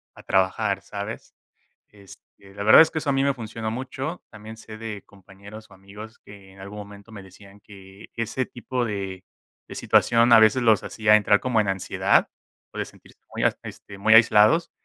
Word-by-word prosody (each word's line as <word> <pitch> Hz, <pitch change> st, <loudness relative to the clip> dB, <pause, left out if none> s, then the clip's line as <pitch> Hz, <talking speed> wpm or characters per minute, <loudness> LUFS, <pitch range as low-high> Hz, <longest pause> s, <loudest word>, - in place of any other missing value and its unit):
a -, -, -14 dB
trabajar, 95 Hz, +1 st, -1 dB
¿sabes? 100 Hz, +2 st, -8 dB, 0.6 s
Este, 100 Hz, -1 st, -19 dB
la 100 Hz, -, -6 dB
verdad 110 Hz, -, +7 dB
es 160 Hz, -, 0 dB
que 160 Hz, -, -2 dB
eso 150 Hz, -2 st, -2 dB
a -, -, +1 dB
mí 135 Hz, 0 st, 0 dB
me 140 Hz, -1 st, +1 dB
funcionó 110 Hz, -1 st, -6 dB
mucho. 130 Hz, +6 st, -6 dB
También 110 Hz, +1 st, -12 dB
sé 110 Hz, -1 st, -12 dB
de 110 Hz, -3 st, -7 dB
compañeros 100 Hz, +2 st, -15 dB
o 95 Hz, -, -18 dB
amigos 105 Hz, +4 st, -13 dB
que 100 Hz, -2 st, -16 dB
en 95 Hz, -, -17 dB
algún 100 Hz, +2 st, -10 dB
momento 100 Hz, +1 st, -12 dB
me 100 Hz, -3 st, -11 dB
decían 100 Hz, +2 st, -17 dB
que 100 Hz, -1 st, -15 dB
ese 115 Hz, +3 st, -3 dB
tipo 125 Hz, 0 st, -5 dB
de 95 Hz, -3 st, -6 dB, 0.4 s
de -, -, -9 dB
situación, 120 Hz, 0 st, +2 dB
a 115 Hz, -, +9 dB
veces, 110 Hz, +3 st, +4 dB
los 110 Hz, -3 st, +2 dB
hacía 110 Hz, -1 st, +2 dB
entrar 105 Hz, -1 st, +2 dB
como 120 Hz, -4 st, 0 dB
en 105 Hz, -, -1 dB
ansiedad 95 Hz, -1 st, 0 dB, 0.4 s
o -, -, -10 dB
de -, -, -2 dB
sentirse -, -, -19 dB, 0.2 s
muy, -, -, -2 dB, 0.2 s
este, 100 Hz, -1 st, -11 dB
muy 110 Hz, +2 st, +3 dB
aislados, 115 Hz, +8 st, +4 dB
105 Hz, 190 wpm, -23 LUFS, 100-115 Hz, 0.6 s, a